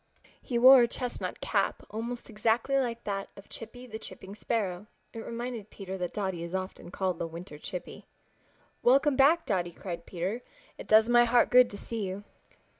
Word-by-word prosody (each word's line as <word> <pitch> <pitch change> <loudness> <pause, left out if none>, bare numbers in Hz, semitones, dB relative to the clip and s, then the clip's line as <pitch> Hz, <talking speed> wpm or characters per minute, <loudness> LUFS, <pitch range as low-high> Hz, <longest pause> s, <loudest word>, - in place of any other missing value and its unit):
He 245 - -2
wore 260 +2 +9
a 240 - +4
chestnut 245 +1 -5
cap, - - 0
almost 235 +3 -5
exactly 225 +5 +1
like 235 -3 -2
that 195 -1 -3
of 200 - -13
Chippy 245 +2 -9
the 220 -3 -7
Chipping 195 -3 -10
Sparrow. 205 -3 -2 0.3
It 225 - -6
reminded 235 -2 -5
Peter 190 -1 -7
that 180 -1 -2
Dotty 190 -4 -2
is 170 +2 -5
often 185 -1 -5
called 185 -1 -2
the 165 - -2
Winter 165 -1 -9
Chippy. 180 +3 -7 0.7
"Welcome 270 +3 +4
back, 290 +6 +5
Dotty!" 175 -4 -1
cried 170 -2 -7
Peter. 190 +7 -3 0.4
"It - - -8
does 220 +1 +6
my 240 0 +6
heart 240 0 +3
good 250 0 +7
to 200 - -8
see 230 +2 -5
you." 190 +2 -5
220 Hz, 180 wpm, -29 LUFS, 190-240 Hz, 0.7 s, wore